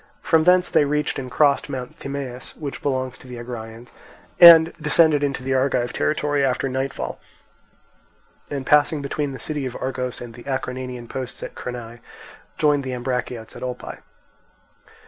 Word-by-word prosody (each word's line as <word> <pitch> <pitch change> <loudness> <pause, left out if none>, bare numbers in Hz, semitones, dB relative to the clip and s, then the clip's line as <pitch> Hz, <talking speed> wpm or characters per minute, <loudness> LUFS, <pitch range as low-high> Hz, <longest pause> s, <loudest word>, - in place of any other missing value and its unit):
From 160 -1 +3
thence 180 0 +5
they - - +3
reached 150 0 -1
and 130 -1 -6
crossed 145 +1 +2
Mount 130 -3 -6
Thymaus, 135 -3 -6
which 145 -3 -6
belongs 130 -2 -2
to - - -14
the 125 -1 -8
Agraeans, 120 -1 -8 0.5
and 170 -1 +10
descended 150 -1 +3
into 140 -2 -2
the 135 +1 -1
Argive 130 -2 +1
territory 145 -2 0
after 135 0 +1
nightfall, 135 +1 -3 1.3
and 140 -2 -4
passing 150 +1 +3
between 145 0 -2
the 135 - -7
city 145 -2 -3
of 125 - -6
Argos 130 -1 -3
and 120 -1 -9
the 120 0 -13
Acarnanian 125 -2 -4
posts 130 0 -6
at - - -6
Crenae, 120 -1 -7 0.6
joined 145 -2 +2
the 130 -1 -4
Ambraciots 125 -2 -4
at - - -10
Olpae. 125 -1 -6
130 Hz, 155 wpm, -22 LUFS, 125-145 Hz, 1.3 s, and